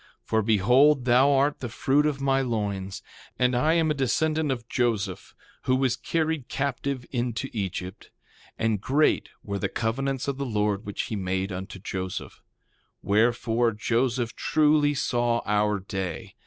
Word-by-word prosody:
3:4 - - -49
For 110 0 +1
behold, 125 +7 +4
thou 130 +3 +5
art 140 +1 +2
the 120 - -5
fruit 135 +5 +2
of 145 -2 -2
my 135 0 +2
loins; 100 -6 -3 0.3
and 125 0 +2
I 155 +6 +3
am 160 -2 +2
a - - +3
descendant 150 +3 0
of 120 -3 -4
Joseph 105 -7 -1 0.3
who 130 - +3
was 130 -2 +1
carried 160 -5 -1
captive 135 -1 -2
into 120 +1 -2
Egypt. 95 -3 -5 0.5
And 110 -3 0
great 145 +7 +2
were 100 -1 -3
the - - -1
covenants 135 +4 -2
of 140 -1 -2
the - - -1
Lord 105 -2 -1
which 100 - -3
he 110 - -4
made 95 0 -2
unto 95 +1 -6
Joseph. 95 -1 -5
3:5 - - -33 0.6
Wherefore, 115 +2 +2
Joseph 115 +2 0
truly 150 -1 +3
saw 120 -3 0
our 105 0 +2
day. 95 -3 -5
120 Hz, 155 wpm, -26 LUFS, 105-135 Hz, 0.6 s, thou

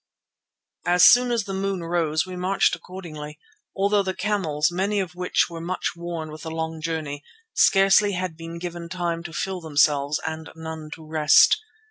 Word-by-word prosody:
As 180 0 +6
soon 245 0 +7
as 235 -2 +1
the 195 - -6
moon 195 -2 -2
rose 165 -2 0
we 185 -1 -7
marched 185 +2 +1
accordingly, 155 -5 -9 0.4
although 200 +1 +2
the 190 -1 -3
camels, 175 -7 0
many 195 +4 0
of 180 -2 -3
which 180 0 +1
were 165 -1 -8
much 180 +2 -2
worn 170 -2 -5
with 155 - -9
the 165 - -6
long 160 0 -4
journey, 155 -3 -4 0.3
scarcely 195 +1 +4
had 180 -2 -3
been 165 +1 -8
given 170 -1 -6
time 170 -2 -2
to 170 -1 -8
fill 190 +2 -3
themselves 145 -1 +2
and 160 0 -5
none 160 -1 -7
to 160 - -14
rest. 155 -1 +5
170 Hz, 170 wpm, -24 LUFS, 160-185 Hz, 0.4 s, soon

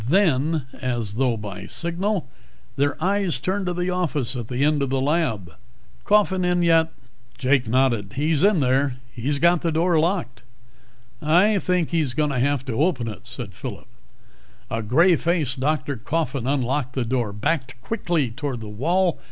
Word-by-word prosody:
Then, 160 -4 +2 0.2
as 120 -5 -2
though 120 0 +1
by 105 -2 -7
signal, 180 +3 -1 0.5
their 145 +1 0
eyes 190 -7 +1
turned 190 +7 -2
to 180 - 0
the 180 +1 -1
office 150 -8 -1
at 120 -3 -5
the 125 +3 -1
end 150 -1 +2
of 140 - 0
the 135 0 0
lab. 130 - 0 0.5
"Coffin 205 -3 +3
come 180 0 +1
in 175 0 +2
yet?" 165 -1 +4 0.5
Jake 130 -2 +2
nodded. 120 -4 +1
"He's 150 +3 +1
in 200 -5 +4
there. 130 0 +1 0.2
He's 130 +5 -1
got 170 +3 +3
the 165 - 0
door 165 +1 +2
locked." 165 - -1 0.8
"I 185 +7 +4
think 180 -3 0
he's 155 -7 0
going 150 -1 +1
to 130 - -1
have 135 0 +1
to 130 - -3
open 145 -9 +1
it," 105 -5 -8
said - - -7
Phillip. - - -7 0.9
A 115 - -1
gray 165 - +4
faced 160 -7 0
Dr. 140 -1 -1
Coffin 135 0 -2
unlocked 130 -1 0
the 130 -3 0
door, 120 -3 -1
backed 130 +4 -2
quickly 170 - -1
toward 135 0 -4
the 110 -2 -8
wall. 170 - +1
145 Hz, 170 wpm, -23 LUFS, 125-170 Hz, 0.9 s, yet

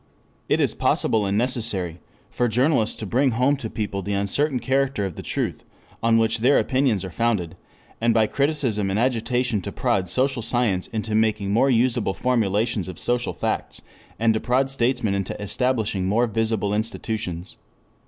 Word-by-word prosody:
It - - +3
is - - +2
possible 105 -3 +1
and 100 +1 0
necessary 105 -8 -1 0.3
for 120 - +1
journalists 125 0 +2
to 110 - -6
bring 125 +5 +2
home 130 +5 +2
to 120 -5 -5
people 105 -3 -3
the 100 +2 -3
uncertain 125 +8 0
character 135 -5 0
of 95 -4 -5
the - - -6
truth - - -3 0.4
on 115 0 +4
which 115 0 +1
their 130 +5 +4
opinions 130 -8 +1
are 95 - -7
founded, 105 -5 -1 0.5
and 115 0 +3
by 110 -1 +4
criticism 130 -7 0
and 95 - 0
agitation 120 -1 0
to - - -5
prod 95 -3 0
social 130 +5 0
science 115 -5 0
into 110 -1 -4
making 105 -2 +1
more 135 +5 +4
usable 120 -4 +2
formulations 110 -5 0
of 90 -3 -7
social 120 0 -1
facts, - - -3 0.3
and 115 +1 +3
to 110 - 0
prod 130 +3 +1
statesmen 120 -5 0
into 100 -1 -3
establishing 105 -2 -1
more 115 +5 +3
visible 110 -2 -1
institutions. 105 -4 -3
115 Hz, 165 wpm, -23 LUFS, 100-125 Hz, 0.5 s, on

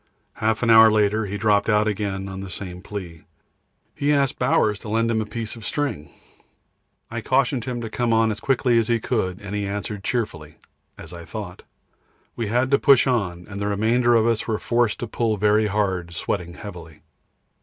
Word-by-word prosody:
Half 110 +2 0
an 115 - +4
hour 110 0 +9
later 105 0 +2
he 100 +1 -4
dropped 105 0 +2
out 105 0 +3
again 100 -2 -2
on 95 0 -7
the 95 - -7
same 90 0 -7
plea. 90 -5 -7 0.7
He 145 +1 0
asked 140 -3 +1
Bowers 105 -1 +2
to 110 - -9
lend 115 +2 +1
him 110 -1 +1
a 105 - -4
piece 110 +1 -5
of 115 - -11
string. 120 - -3 1.0
I 115 0 -3
cautioned 130 0 +1
him 125 -2 -4
to 115 - -4
come 120 0 0
on 110 0 +3
as 105 - -5
quickly 125 -2 +2
as 115 - 0
he 120 -1 +1
could, 100 -6 -2
and 100 -1 -8
he 105 -1 -2
answered 100 0 -4
cheerfully 85 -12 -3 0.4
as 80 - -10
I 85 -1 -8
thought. 90 +1 -7 0.7
We 115 - -3
had 125 +5 +1
to 140 - +4
push 140 -3 +5
on, 95 -9 -1
and 100 -1 -7
the 100 - -1
remainder 115 +4 +2
of 110 -1 +4
us 115 -1 0
were 110 -2 0
forced 120 -1 0
to 120 - -3
pull 110 -1 -1
very 105 +2 +3
hard, 95 -5 -1
sweating 85 0 -3
heavily. 85 -7 -10
105 Hz, 195 wpm, -23 LUFS, 100-115 Hz, 1.0 s, hour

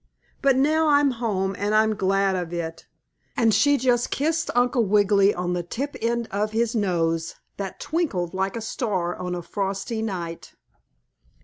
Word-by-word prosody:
But 275 -2 +4
now 310 +4 +3
I'm 285 -1 +4
home, 200 -5 -1
and 205 +1 0
I'm 220 0 +4
glad 195 -1 +1
of 175 -2 -3
it," 165 -1 -5 0.5
and 225 -2 +3
she 285 +8 +4
just 245 -1 +1
kissed 320 +3 0
Uncle 245 0 +3
Wiggily 200 -1 +4
on 180 -1 -2
the 175 - -1
tip 265 +12 -5
end 235 0 0
of 210 +2 -1
his 230 0 +1
nose, 165 -6 0 0.2
that 195 -2 -5
twinkled 240 - -2
like 190 +2 -1
a 230 - -4
star 195 -7 -2
on 180 0 -4
a 175 - -5
frosty 195 +4 -3
night. 175 -6 -5
205 Hz, 165 wpm, -24 LUFS, 185-240 Hz, 0.5 s, But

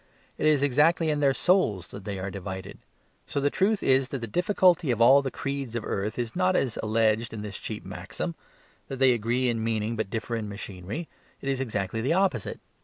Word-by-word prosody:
It 155 - +2
is 150 -2 +4
exactly 155 +4 +3
in 150 - 0
their 140 -2 +4
souls 130 - +2
that 100 -1 -9
they 100 -2 -3
are 95 +1 -4
divided. 95 -1 -7 0.5
So - - -2
the 140 +1 +1
truth 200 +2 +1
is 135 0 +3
that 135 - -3
the 120 - -4
difficulty 180 - +3
of 120 -2 +1
all 130 +4 +7
the 135 - -2
creeds 135 -3 -4
of 120 - -2
the - - -6
earth 100 +2 -2
is 120 -2 -3
not 185 0 +2
as 125 -9 0
alleged 110 +1 +1
in 105 - -5
this 100 -2 -6
cheap - - -6
maxim: 80 +2 -5 0.5
that 135 - -5
they 130 -1 +5
agree 120 +3 0
in 115 -2 0
meaning, 110 0 -1
but 110 -3 -2
differ 115 +1 -3
in 110 -2 -3
machinery. 100 - -6 0.3
It 140 - -4
is 135 -1 0
exactly 110 -3 -2
the 130 +7 +1
opposite. 180 - 0
120 Hz, 215 wpm, -27 LUFS, 105-145 Hz, 0.5 s, all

